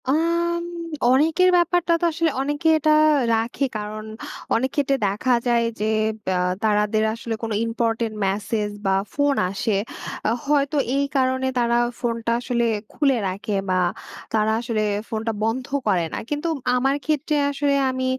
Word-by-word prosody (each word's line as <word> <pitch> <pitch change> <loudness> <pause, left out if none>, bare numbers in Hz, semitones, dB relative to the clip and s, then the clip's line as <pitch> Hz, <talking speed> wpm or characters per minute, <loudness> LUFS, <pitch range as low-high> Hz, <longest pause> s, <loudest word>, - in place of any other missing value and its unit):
আম 340 +3 +1 0.5
অনেকের 320 +7 +4
ব্যাপারটা 345 0 +2
তো - - +2
আসলে 325 +1 +1
অনেকে 290 +3 -1
এটা 310 0 +2 0.4
রাখে। 230 +5 -1
কারণ 215 +1 -5 0.5
অনেক 260 +3 +1
ক্ষেত্রে 275 -1 +2
দেখা 210 +6 +1
যায় 235 -1 +3
যে, 210 - 0 0.5
আ - - 0 0.2
তারাদের 210 0 +2
আসলে 230 0 -4
কোনো 225 -1 -2
ইম্পোর্টেন্ট 230 -1 -1
মেসেজ 205 +2 -1 0.2
বা 190 0 +3 0.2
ফোন 285 -1 +2
আসে। 200 +2 -1 0.5
আ - - +3 0.2
হয়তো 285 0 +1 0.2
এই 280 0 +2
কারণে 260 0 +1
তারা 235 0 +2 0.2
ফোনটা 230 -1 -1
আসলে 240 -1 0 0.3
খুলে 275 -4 +2
রাখে 200 +2 -3
বা 185 0 +2 0.5
তারা 215 0 +2
আসলে 230 -2 -1 0.3
ফোনটা 225 0 -2
বন্ধ 235 +4 -1 0.2
করে 180 -5 +2
না। - - -2
কিন্তু 295 +3 -2 0.3
আমার 270 +2 +2
ক্ষেত্রে 305 0 0 0.2
আসলে 285 0 0 0.2
আমি 260 0 -2
245 Hz, 145 wpm, -23 LUFS, 220-290 Hz, 0.5 s, অনেকের